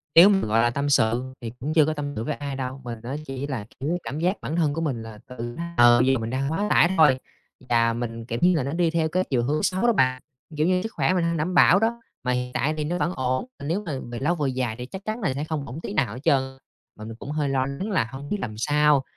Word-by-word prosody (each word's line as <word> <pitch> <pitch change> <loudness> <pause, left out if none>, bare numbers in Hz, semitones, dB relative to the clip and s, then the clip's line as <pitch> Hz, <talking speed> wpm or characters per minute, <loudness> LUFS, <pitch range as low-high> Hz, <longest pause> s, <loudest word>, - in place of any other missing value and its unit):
Nếu 175 +4 +10
mà, 200 -2 +4
gọi 110 +2 +3
là, 120 - +3
tâm 140 +4 -1
sự 120 -2 +3 0.2
thì 115 -2 -5
cũng 145 +5 -3
chưa 155 -2 +5
có 155 - 0
tâm 145 -1 -4
sự 110 - -3
với 150 - -2
ai 140 -1 -5
đâu. 130 0 -5
Mình 120 -2 -6
á 130 +4 -4
chỉ 135 0 -5
là, 125 -8 -4
kiểu, 155 +7 -1
cảm 145 - -5
giác 180 +5 0
bản 155 - -3
thân 155 -4 +2
của 165 - -3
mình 135 -8 -2
là 110 -2 -10
tự 120 -1 -6 0.2
ờ, 120 0 +7
bây 130 +2 +4
giờ 130 - +1
mình 115 0 -4
đang 135 +3 -1
quá 200 +6 0
tải 170 - +5
thôi 145 -5 +5 0.5
và 115 -1 +3
mình, 115 -1 -5
kiểu 115 0 -3
như 180 0 +5
là, 155 - +1
nó 140 - -3
đi 170 -1 +1
theo 160 -1 +1
cái 185 +3 +1
chiều 120 -3 +1
hướng 150 +4 0
xấu 185 0 0
đó 235 - +4
bạn. 130 -7 +2 0.4
Kiểu 155 +2 +2
như, 180 0 +2
sức 225 - -4
khỏe - - +2
mình 180 -2 +1
hông 170 0 0
đảm 160 +5 -1
bảo 180 +1 +6
đó, 230 +2 0 0.2
mà 125 - 0
hiện 125 0 -2
tại 155 +3 0
thì 155 - -1
nó 170 +4 -2
vẫn 180 0 0
ổn, 130 - -1
mà 140 - -7
nếu 175 +8 -1
mà 160 - -4 0.2
về 120 - -4
lâu 160 +6 +1
về 145 -5 -1
dài 125 -3 -2
thì 125 - -6
chắc 190 +9 -8
chắn 220 +2 -3
là 185 -10 0
sẽ 140 +3 -3
không 155 -3 -3
ổn 130 +5 -7
tí - - -5
nào 105 -1 0
hết 125 - -7
trơn. 140 -5 +4 0.5
Mà 110 - -9
mình 115 0 -7
cũng 135 +5 -8
hơi 150 -2 -1
lo 130 -1 +1
lắng 140 +11 -4
là 185 - +2
hông 135 +2 -8
biết 210 - 0
làm 110 -3 -4
sao, 145 +3 +3
140 Hz, 295 wpm, -24 LUFS, 125-165 Hz, 0.5 s, Nếu